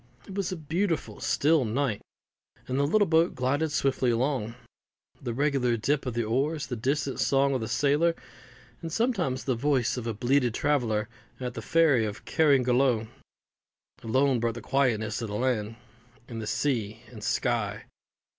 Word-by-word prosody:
It 195 - -10
was 195 -2 -2
a - - -2
beautiful 165 +3 -2
still 155 0 +2
night, 120 -1 -1 0.7
and 130 +1 -1
the 140 - +2
little 205 +6 +3
boat 165 0 +2
glided 140 +5 0
swiftly 135 -3 +1
along. 120 -1 0 0.7
The 125 - -3
regular 130 -2 +1
dip 135 +5 0
of 120 - -3
the 120 - 0
oars, 140 +8 0
the 125 - -4
distant 135 +4 -1
song 140 0 +2
of 130 - -1
the 110 - -3
sailor, 145 +8 +2 0.7
and 165 - -5
sometimes 195 - 0
the 130 - 0
voice 130 0 +1
of 120 -1 -4
a 115 - -1
belated 125 +1 +1
traveller 115 -8 0 0.3
at 125 -1 -4
the - - -6
ferry 160 -8 +3
of 105 -1 -5
Carrigaloe, 125 -6 +2 0.9
alone 130 +3 +2
broke 115 0 -1
the - - -7
quietness 125 -5 0
of 115 - -3
the 105 - -5
land 115 -2 -1 0.5
and 115 -3 -5
sea 110 -5 -1
and - - -10
sky. - - -1
130 Hz, 160 wpm, -27 LUFS, 115-145 Hz, 0.9 s, little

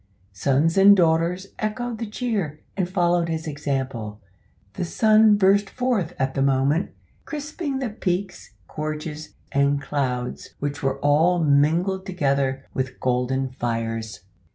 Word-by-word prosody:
Sons 140 - +2
and 200 +1 +8
daughters 170 +3 +1
echoed 225 +2 -3
the 230 -3 -4
cheer, 210 - -2 0.2
and 185 -3 -1
followed 175 -2 +1
his 160 0 -3
example. 135 -8 -3 0.5
The - - -3
sun 215 +3 +4
burst 200 0 +3
forth 240 -10 -1
at 135 -1 -1
the 135 - -1
moment, 140 +5 +2 0.4
crisping 300 -1 -4
the 260 -4 -3
peaks, 185 -2 -3
gorges, 155 0 -5 0.2
and 140 0 +2
clouds 130 -4 -3
which 145 +2 -4
were 135 -1 0
all 155 +5 +3
mingled 165 +7 +2
together 140 -6 0
with 130 0 -3
golden 130 +1 0
fires. 115 -4 -3
160 Hz, 130 wpm, -23 LUFS, 135-195 Hz, 0.5 s, and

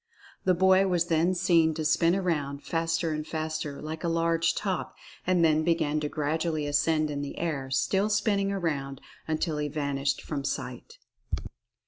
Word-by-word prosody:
The 185 -1 +4
boy 190 +2 +5
was 175 -2 +1
then 165 +3 +2
seen 165 -3 +3
to 155 -1 -3
spin 165 +3 +3
around, 145 -7 -1
faster 165 +1 0
and 155 0 -3
faster, 155 -3 -3
like 155 +2 -6
a - - 0
large 165 0 +1
top, 190 -3 -2 0.3
and 180 -2 +4
then 155 0 +3
began 155 -2 +1
to 150 -1 -2
gradually 155 +1 -1
ascend 150 +1 +1
in 145 -1 -3
the 145 - -6
air, 145 -6 -2
still 190 +10 +1
spinning 200 -2 +1
around, 145 -8 -2 0.3
un 155 -1 0
til 155 -2 -1
he 150 - -1
vanished 140 -2 -1
from 145 -3 -4
sight. 455 - -5
160 Hz, 165 wpm, -28 LUFS, 150-175 Hz, 0.3 s, boy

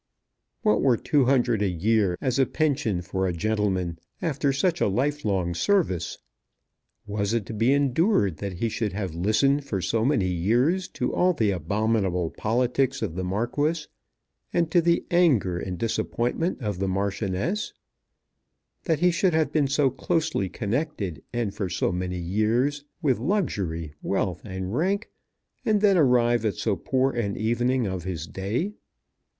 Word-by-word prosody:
What 105 - +3
were 125 -4 +4
two 140 +2 +2
hundred 120 -4 +2
a 100 - +2
year 95 +1 +1
as 130 0 0
a 135 - +4
pension 140 - 0
for 95 +1 -1
a 90 - -1
gentleman 95 -3 -1 0.2
after 145 -3 0
such 170 +5 0
a - - +4
life 140 +9 0
long 95 -4 0
service? 95 - 0 0.9
Was 100 +1 -1
it 115 -4 -1
to - - -7
be 115 +4 +2
endured 140 - +2
that 100 +3 -4
he 105 +6 -1
should 110 -2 -2
have 95 -4 -3
listened 110 - +2
for 105 -8 -3
so 110 +6 0
many 125 -7 +2
years 120 - +1
to - - -2
all 180 0 +3
the 110 -10 +1
abominable 95 -1 0
politics 125 +3 0
of 95 -7 -2
the 95 +2 -3
Marquis, 145 - -1 0.7
and 170 -2 +1
to 175 - +5
the 170 +1 +2
anger 130 - +3
and 90 -1 -4
disappointment 120 - -1
of 105 -4 -2
the 95 - 0
Marchioness, 100 - -1 1.1
that 160 -4 +1
he 180 0 +5
should 175 0 +2
have 160 -1 +2
been 150 -3 +2
so 140 -1 +2
closely 155 - -1
connected, 110 - -3
and 120 -5 -2
for 100 -3 -3
so 85 - 0
many 90 0 -3
years, 110 +11 0 0.2
with 130 -7 +2
luxury, 100 - -1
wealth, 95 -3 -1
and 95 -1 -5
rank, 195 - 0 0.5
and 215 -1 +2
then 200 -1 +4
arrive 120 -6 +3
at 105 -4 0
so - - 0
poor 130 +1 +1
an 105 -5 -2
evening 120 +3 +1
of 95 -3 -3
his 85 -4 -4
day? 110 - -3
115 Hz, 160 wpm, -25 LUFS, 95-145 Hz, 1.1 s, to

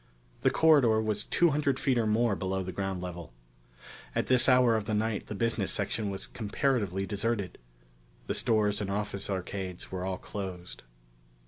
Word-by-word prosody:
The - - +4
corridor 140 -9 +5
was 110 -1 -1
two 170 -2 +3
hundred 140 -2 +1
feet 130 -3 +2
or 110 - +1
more 110 0 +2
below 95 0 -2
the 95 - -5
ground 95 -1 -3
level. 85 -7 -7 0.8
At - - +1
this 130 0 +4
hour 125 -2 +5
of 110 -2 -1
the 110 0 -1
night 110 0 -1
the 105 - -5
business 115 +2 0
section 110 -3 -1
was 95 -1 -5
comparatively 105 - -1
deserted. 100 0 -2 0.7
The - - -2
stores 105 -3 +1
and 100 - -3
office 100 -1 -3
arcades 95 -1 -4
were 90 -1 -3
all 95 0 -2
closed. 95 -4 -7
105 Hz, 165 wpm, -29 LUFS, 95-115 Hz, 0.8 s, corridor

